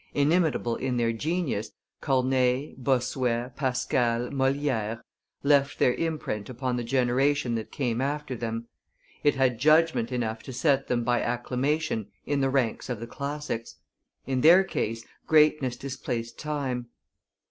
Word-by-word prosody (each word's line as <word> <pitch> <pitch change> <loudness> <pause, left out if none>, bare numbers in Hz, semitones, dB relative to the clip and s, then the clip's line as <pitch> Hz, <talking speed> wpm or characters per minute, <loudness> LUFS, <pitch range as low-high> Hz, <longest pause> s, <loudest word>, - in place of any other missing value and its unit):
Inimitable 145 -5 +2
in 130 -1 -1
their 115 -1 +1
genius, 150 - -2 0.3
Corneille, 130 0 +1
Bossuet, 125 -1 0
Pascal, 125 -2 0
Moliere 135 -5 0 0.4
left 140 -1 +3
their 125 - +3
imprint 150 -11 -3
upon 130 0 -2
the 120 - -2
generation 130 +2 +1
that 110 -1 -4
came 120 -3 -1
after 145 -1 -2
them; 115 0 -4 0.6
it 145 - +4
had 130 -3 +2
judgment 155 -4 +3
enough 110 -3 -2
to 130 - -8
set 135 0 +2
them 120 -1 0
by 120 0 +1
acclamation 125 0 -1 0.2
in 145 -1 0
the 135 - +2
ranks 130 -3 0
of 120 -4 -3
the 115 - -5
classics; 140 -2 -5 0.5
in 130 -1 -1
their 175 +6 +7
case, 115 - -3 0.2
greatness 150 -5 +4
displaced 125 -3 -5
time. 135 -5 -3
130 Hz, 135 wpm, -27 LUFS, 120-145 Hz, 0.6 s, their